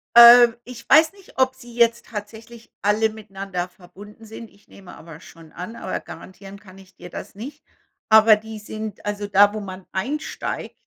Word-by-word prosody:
Äh, 235 0 +10 0.2
ich 240 -1 -12
weiß 315 +2 +5
nicht, 395 -2 -19
ob 260 0 +1
sie 240 -2 -15
jetzt 235 0 +1
tatsächlich 225 +2 -10
alle 215 +2 +1
miteinander 195 -4 -6
verbunden 205 +5 -16
sind. 220 +1 -11
Ich 200 - -27
nehme 190 -2 -15
aber 165 -2 -13
schon 165 -1 -16
an, 185 +6 -9
aber - - -5
garantieren 195 +1 -12
kann 190 -2 -17
ich 190 0 -18
dir 175 - -12
das - - -10
nicht. 275 +8 -10 0.5
Aber 220 0 +7
die 220 +1 -9
sind 215 0 -8
also, 205 0 -4
da, 205 +1 +4
wo 215 - -4
man 185 -2 -9
einsteigt 275 +11 -5
215 Hz, 175 wpm, -21 LUFS, 195-235 Hz, 0.5 s, Äh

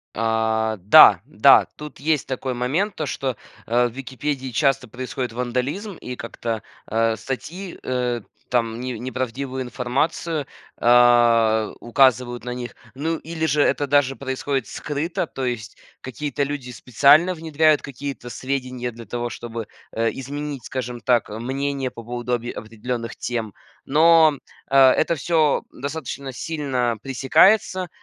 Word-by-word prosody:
А, 110 -1 0
да, 100 - +8
да. - - +5
Тут 150 0 -9
есть 150 -1 0
такой 130 0 -3
момент, 145 - -1
то 155 - -3
что, 130 -5 -3 0.3
э, 120 +1 +2
в - - -8
"Википедии" 135 0 -4
часто 135 0 +1
происходит 125 0 -4
вандализм, 125 - -3
и 125 -5 -7
как-то, 115 -1 -4 0.2
э, 115 +1 +1
статьи, 165 - -6
э, 125 -2 -1 0.3
там 115 -1 0
не 125 -3 -4
не 130 +1 -5
правдивую 130 +1 -3
информацию, 140 +5 -2 0.3
а, 120 -2 +4
указывают 120 -1 +2
на 125 - -4
них, 125 -1 -6 0.2
ну 160 +5 -1
или 160 +1 -4
же 150 -2 +2
это 140 +1 +2
даже 135 -1 +2
происходит 130 -1 -2
скрыто. 150 +3 -3
То 135 - -5
есть 120 -3 -4 0.2
какие-то 140 +2 -3
люди 140 -3 -4
специально 140 +9 +4
внедряют 155 -2 +2
какие-то 140 -2 -7
сведения 125 -1 -3
для 115 0 -11
того, 120 +3 -3
чтобы, 115 -1 -6 0.3
э, 115 0 +1
изменить, 140 -1 -6
скажем 125 -2 -4
так, 120 -3 +1
э, 105 +1 -6
мнение 135 +1 -2
по 115 - -10
поводу 120 +1 -4
объе 120 0 -2
определенных 115 +1 -5
тем. 115 -4 -4 0.3
Но, 160 +2 +6
м, 140 - -12 0.3
э, 135 - +3
это 165 +4 +1
всё 155 -1 +2
достаточно 140 -1 -6
сильно 130 -5 -2
пресекается, 180 - +3
130 Hz, 140 wpm, -22 LUFS, 120-145 Hz, 0.3 s, да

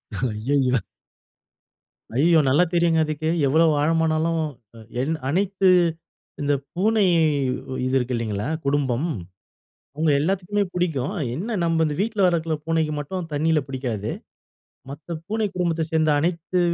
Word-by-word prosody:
அய்யயோ! 125 +4 +1 1.4
ஐய்யோ! 160 +5 +5
நல்லா 140 +6 +4
தெரியுங்க 170 -1 +3
அதுக்கு, 155 +1 -2 0.2
எவ்வளோ 160 +5 +4 0.2
ஆழமானாலும் 160 +1 +1 0.6
என் 155 +5 0
அனைத்து, 190 +3 +2 0.7
இந்த 145 0 +1 0.2
பூனை 215 +3 +2 0.8
இது 130 - -1
இருக்கு 125 0 -2
இல்லைங்களா 110 +1 -2 0.2
குடும்பம், 140 0 0 0.9
அவங்க 155 +1 +1
எல்லாத்துக்குமே 195 +5 0
பிடிக்கும், 170 -2 -1 0.2
என்ன 215 +6 -3
நம்ம 165 -1 +2
இந்த 150 - -2
வீட்டில 210 -3 +1
வளர்க்கிற 165 -3 0
பூனைக்கு 160 -2 0
மட்டும் 170 +3 -5
தண்ணீல 155 0 +2
பிடிக்காது, 125 -6 -3 0.8
மத்த 155 +3 -7
பூனை 215 0 -1
குடும்பத்தை 165 -3 0
சேர்ந்த 155 -1 +3
அனைத்து 170 +2 -1
160 Hz, 115 wpm, -23 LUFS, 140-175 Hz, 1.4 s, ஐய்யோ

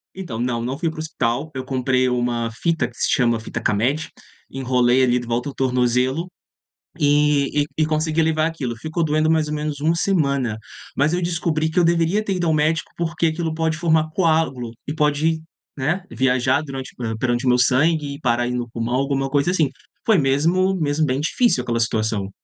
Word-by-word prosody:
Então 160 -13 -6
não, 120 -1 -1
não 130 +3 -3
fui 165 +1 -1
para 160 - -9
o - - -5
hospital, 145 -1 -2
eu 130 -1 -4
comprei 130 -1 +1
uma 120 -2 -1
fita 165 -1 +1
que - - -20
se - - 0
chama 120 -3 +2
fita 115 +1 -6
K-med, 130 +11 0 0.4
enrolei 125 -1 +2
ali 125 0 +3
de 120 - -8
volta 120 +4 -1
ao - - -8
tornozelo 125 +5 +1 0.7
e 145 -1 +2
e 155 - +2
consegui 155 +1 +1
levar 155 0 +1
aquilo. 130 -8 -3
Ficou 160 +6 -2
doendo 155 +1 +2
mais 155 -2 +2
ou 150 - -2
menos 150 -1 -3
1 160 +3 +2
semana, 140 - 0 0.4
mas 145 +4 +2
eu 180 0 0
descobri 165 -2 0
que 170 - -1
eu 175 - +5
deveria 170 +5 +2
ter 195 - -1
ido 175 -1 -1
ao 160 - +2
médico, 155 +2 +1
porque 170 0 -1
aquilo 160 0 -1
pode 160 -1 0
formar 160 -1 +2
coágulo 155 -9 +1 0.2
e 145 - -3
pode, 155 +1 +1 0.3
né, 160 +8 -1
viajar 130 +3 +1
durante 135 -3 -7 0.2
perante 120 +1 0
o - - +3
meu 125 0 +4
sangue 145 +3 +2
e 140 - -11
parar 120 -2 +1
ai 120 - -2
no 120 -1 -3
pulmão, 115 +1 -3
alguma 135 0 0
coisa 145 +4 +2
assim. 160 -6 +2 0.4
Foi 215 -5 +4
mesmo 165 +8 +2
mesmo 155 -1 0
bem 130 +1 -1
difícil 165 - +1
aquela 115 -1 -1
situação. 110 -3 -1
145 Hz, 195 wpm, -21 LUFS, 125-160 Hz, 0.7 s, eu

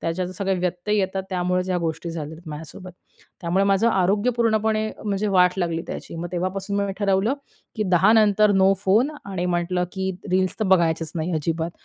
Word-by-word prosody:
त्याच्यात 175 +2 -2
सगळे 195 -1 0
व्यत्यय 180 +4 -1
येतात. 190 0 -1
त्यामुळेच 180 0 0
या 180 - +1
गोष्टी 165 0 -3
झालेल्या 160 0 -7
माझ्यासोबत. 160 +5 -8 0.5
त्यामुळे 180 +3 +1
माझं 200 +3 +3
आरोग्यपूर्णपणे, 220 +2 +1 0.2
म्हणजे 205 0 -1
वाट 180 0 +5
लागली 170 -3 -1
त्याची. - - -7
मग 175 +1 -4
तेव्हापासून 190 +3 -2
मी 200 -1 -2
ठरवलं, 200 +4 +2 0.4
की 215 - 0
10:00 195 +6 +5
नंतर 210 -1 +4
नो 195 - +6
फोन. 220 +9 +3
आणि 185 -3 -3
म्हटलं, 180 +1 0
की 190 -1 -2 0.2
रील्स 185 +2 +1
तर - - +2
बघायचेच 165 -2 0
नाही, 165 +1 -2
अजिबात. 160 +2 -1
185 Hz, 165 wpm, -23 LUFS, 175-200 Hz, 0.5 s, नो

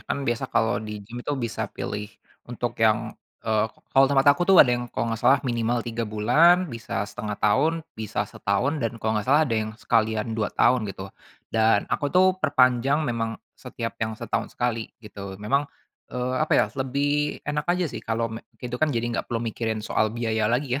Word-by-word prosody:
Kan, 140 - -2
biasa 120 +2 -1
kalau 115 +1 +1
di 105 -1 -7
gym 120 +4 -8
itu, 145 - -3
bisa 110 -2 -3
pilih 105 +1 -5 0.4
untuk 120 -1 -3
yang, 110 0 +2 0.3
eee, 110 -1 +2 0.3
kalau 135 0 +6
tempat 135 0 +2
aku 175 - -2
tuh, 195 - +7
ada 125 - 0
yang 120 0 -2
kalau 115 -1 -2
enggak 115 - -4
salah 130 +3 +5
minimal 120 -1 0
3 115 -1 -3
bulan, 150 +13 +4
bisa 115 -3 -3
1/2 105 0 -5
tahun, 155 +10 +2
bisa 110 -2 -3
setahun, 130 +10 -1
dan 115 -1 -2
kalau 110 -1 -1
enggak 105 -2 -1
salah, 150 +3 +5
ada 130 - -3
yang 110 - -3
sekalian 110 0 0
2 110 -2 -1
tahun, 120 -5 +2
gitu. 95 0 -8 0.4
Dan, 110 -2 +3
aku 145 - 0
tuh, 185 +4 +4
perpanjang 135 0 +3
memang 115 -3 -2 0.2
setiap 120 -3 -6
yang 110 -1 -2
setahun - - -3
sekali, 115 -2 -1 0.2
gitu, 100 -2 -8
memang, 140 +9 0 0.4
eee, 125 0 -2
apa 155 - +1
ya, - - +5 0.2
lebih 145 +3 -1
enak 150 0 -2
aja 180 - 0
sih - - -5
kalau 115 0 -2
me 110 - -6 0.2
itu 125 0 -5
kan. 155 - +3
Jadi, 120 -5 -1
enggak - - -3
perlu 115 0 -2
mikirin 110 -1 -3
soal 110 - +1
biaya 110 -2 0
lagi, 125 +2 0
115 Hz, 195 wpm, -25 LUFS, 110-135 Hz, 0.4 s, tuh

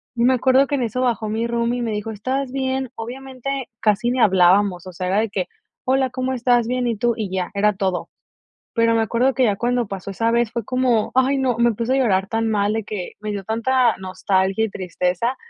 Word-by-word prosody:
me 240 +2 +3
acuerdo 260 +2 +4
que 285 - -1
en 265 - -1
eso 240 +2 -2
bajó 230 -4 0
mi 225 +2 -1
roomie, 235 +1 0
y - - -2
me 230 - -2
dijo: 210 +1 -3
"¿Estás 255 +5 -3
bien?" 265 -1 -2
Obviamente, 265 +2 -5
casi 215 +2 +2
ni 255 - 0
hablábamos, 190 -2 +4
o 185 - -8
sea, 185 - -4
era 195 - +2
de 225 -1 0
que: 190 -2 -2 0.4
"Hola, 265 0 +2
¿cómo 255 +1 -2
estás? 245 -2 +2
Bien, 250 0 0
¿y 230 - 0
tú?". 240 +3 +1
Y 215 -5 -3
ya, 185 -1 -3
era 210 +1 +2
todo. 190 -2 -2 0.6
Pero 230 -1 +3
me 225 - +3
acuerdo 240 +4 +1
que 260 - +1
ya 205 -4 +2
cuando 245 +1 0
pasó 195 0 -5
esa 230 +4 0
vez 235 -1 +2
fue 235 - -2
como, 250 -1 +1
ay 260 +2 +3
no, 255 -3 0
me 235 0 +3
puse 230 +3 -2
a - - +2
llorar 195 -7 +1
tan 225 0 0
mal 205 -1 +1
de 220 -1 -2
que 200 -4 -5
me 210 0 -4
dio 200 -1 -4
tanta 235 +3 +1
nostalgia 190 +2 0
y 220 - 0
tristeza, 185 +5 -2
230 Hz, 230 wpm, -21 LUFS, 205-255 Hz, 0.6 s, acuerdo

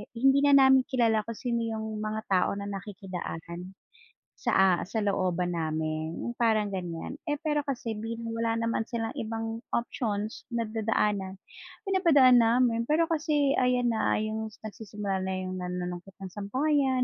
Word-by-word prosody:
hindi 270 +3 +4
na 285 -1 +6
namin 265 -1 +6
kilala 230 -4 +2
kung 230 - -4
sino 235 -2 -1
'yung 220 -1 -3
mga 215 0 -2
tao 185 -1 +3
na 200 - -5
nakikidaan 185 -3 -6 0.6
sa - - -1
a 190 0 +6 0.2
sa 220 +1 -2
looban 185 -3 0
namin, 155 0 -2
'yung 240 0 -4
parang 220 -3 +2
ganiyan. 180 - -5
Eh, 295 -1 -1
pero 295 -2 +1
kasi 240 -5 -3
bilang 230 +1 -5
wala 230 0 +1
naman 230 -1 0
silang 225 -2 -3
ibang 225 -1 -3
options 220 -3 -2
na 235 - +1
dadaanan, 210 -3 0 0.5
pinapadaan 300 -10 +6
namin 230 0 +3
pero 325 +2 +4
kasi 295 -3 +1
ayan 250 -1 +2
na 220 - +1
'yung 220 0 -2 0.2
nagsisimula 205 -2 -4
na 190 - -2
'yung 185 0 -4
nanunungkit 180 +1 -5
ng 190 - -5
sampayan, 260 +5 +1
220 Hz, 150 wpm, -28 LUFS, 195-245 Hz, 0.6 s, na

